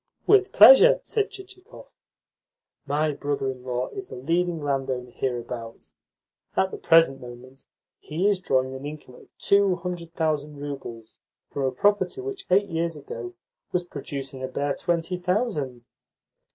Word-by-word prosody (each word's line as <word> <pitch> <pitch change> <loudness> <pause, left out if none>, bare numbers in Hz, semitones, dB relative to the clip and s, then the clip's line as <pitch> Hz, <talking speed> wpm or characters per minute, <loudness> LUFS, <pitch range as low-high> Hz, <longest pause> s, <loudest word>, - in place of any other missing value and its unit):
"With 405 -1 +4
pleasure," - - +8
said 425 -2 -1
Chichikov. 390 +1 -13 1.0
"My 150 +2 +1
brother 140 -2 -2
in 130 -1 -11
law 125 0 -2
is 390 -1 -7
the - - -8
leading 170 +6 0
landowner 130 -3 -2
hereabouts. 120 -2 -5 0.6
At 190 0 +2
the - - -6
present 165 -5 +4
moment 125 +2 -12 0.3
he 170 +6 -1
is 205 -3 +2
drawing 130 -6 0
an 130 +1 -8
income 145 -3 -8
of - - -16
two 200 -2 +3
hundred 170 -1 -6
thousand 150 -2 -1
roubles 130 -6 -8 0.3
from 140 - -2
a 130 - +1
property 205 - +1
which, 390 0 -6
eight 200 +2 +4
years 165 0 -1
ago, 360 - -8 0.4
was 180 - 0
producing 135 -6 -6
a 130 - -2
bare 140 +2 -1
twenty 170 +2 -1
thousand." 180 - -2
155 Hz, 145 wpm, -25 LUFS, 130-190 Hz, 1.0 s, pleasure